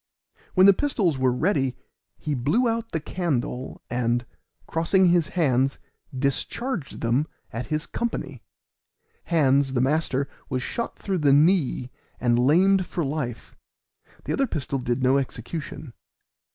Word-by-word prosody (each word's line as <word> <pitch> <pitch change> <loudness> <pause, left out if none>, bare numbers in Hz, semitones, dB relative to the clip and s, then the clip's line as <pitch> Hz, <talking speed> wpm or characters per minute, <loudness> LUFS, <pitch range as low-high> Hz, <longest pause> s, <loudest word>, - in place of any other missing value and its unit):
When 185 0 +7
the 200 - +9
pistols 190 - 0
were 130 -1 +3
ready 135 -2 0 0.4
he 150 - -3
blew 145 - +2
out 230 0 -2
the 160 - -1
candle, 145 -7 -3
and, 120 -1 0 0.4
crossing 175 +3 +3
his 175 -3 +3
hands, 135 -4 +2 0.4
discharged 145 - -2
them 125 +6 +1 0.3
at 115 +2 -4
his 155 -1 -1
company; 145 - -4 0.8
Hands, 140 -4 +3
the 125 - +1
master, 140 0 +1 0.2
was 130 0 -2
shot 235 - -4
through 190 -3 -2
the 145 -3 +4
knee 145 -5 +3 0.3
and 120 -1 +2
lamed 180 +8 +4
for 170 - -2
life, 135 -5 -4 0.7
the - - -2
other 275 - +1
pistol 135 - -3
did 125 +1 -1
no 130 +2 +4
execution. 140 +1 -6
145 Hz, 135 wpm, -25 LUFS, 130-175 Hz, 0.8 s, the